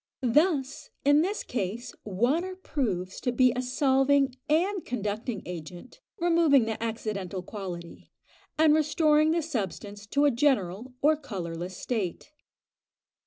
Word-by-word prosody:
Thus, 295 -4 +1 0.2
in 290 +1 +6
this 395 +5 -1
case, 235 +2 -4
water 265 - 0
proves 205 - -3
to 245 - 0
be 250 0 +4
a 250 - 0
solving 270 +1 +2 0.2
and 360 +5 +1
conducting 215 -1 -3
agent, 175 - -9 0.2
removing 330 -7 +4
the 225 0 -4
accidental 205 -5 -3
quality, 180 -4 -8 0.5
and 310 -1 +5
restoring 305 0 +3
the 330 0 +1
substance 205 - -5
to 285 +6 +2
a 290 - +5
general 240 -3 0
or 310 +2 +5
colourless 180 - -6
state. 215 - -3
250 Hz, 120 wpm, -28 LUFS, 200-300 Hz, 0.5 s, in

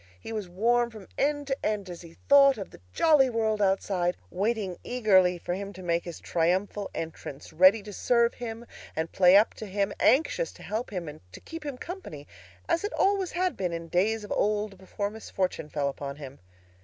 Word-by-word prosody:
He 225 - -7
was 210 -5 -4
warm 235 +6 +2
from 215 -4 -12
end 290 0 0
to 270 -1 -1
end 210 -2 -1
as 175 -2 -8
he 170 -1 -13
thought 275 -2 +7
of 195 - -7
the - - -15
jolly 295 - +4
world 220 -2 0
outside, 190 -2 +1
waiting 200 -1 -1
eagerly 190 -7 +3
for 175 - -4
him 200 +2 -5
to 185 - -10
make 170 -1 0
his 170 -2 -7
triumphal 185 +4 0
entrance, 160 -4 -7
ready 185 +6 +6
to 210 0 -9
serve 235 +3 +2
him 230 -1 -7 0.3
and 160 +1 -2
play 185 +1 +6
up 210 - +4
to 215 - -8
him, 200 +1 -1
anxious 325 - +3
to - - -14
help 220 +4 -3
him 180 -5 -5
and 150 +1 -9
to - - -9
keep 325 -1 -9
him 285 -4 -5
company, 300 - -8 0.4
as 335 - +1
it 415 - -3
always 390 -2 +1
had 365 +1 0
been 180 -3 -2
in 165 0 -6
days 210 +5 +1
of 205 - -9
old 210 -1 0
before 200 +2 -4
misfortune 190 -7 -3
fell 145 -2 -1
upon 140 0 -5
him. 140 -2 -10
205 Hz, 200 wpm, -28 LUFS, 180-235 Hz, 0.4 s, thought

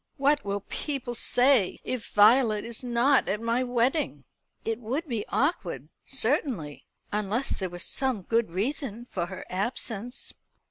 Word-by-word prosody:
"What 285 +1 +3
will 200 0 -2
people 265 +1 -4
say 245 -3 +3
if 255 -4 -4
Violet 215 0 +5
is 235 +1 -5
not 250 +3 +3
at 205 +2 0
my 230 +2 +1
wedding?" 245 - 0 0.4
"It 225 0 -1
would 265 +8 -3
be 230 -6 -2
awkward, 200 - -1 0.2
certainly; 250 - -1 0.2
unless 210 +5 0
there 190 -2 -2
were 175 - -8
some 250 +3 -1
good 230 +2 +1
reason 235 - -3
for 175 -2 -2
her 185 +1 -7
absence." 225 +4 -3
235 Hz, 140 wpm, -27 LUFS, 205-265 Hz, 0.4 s, Violet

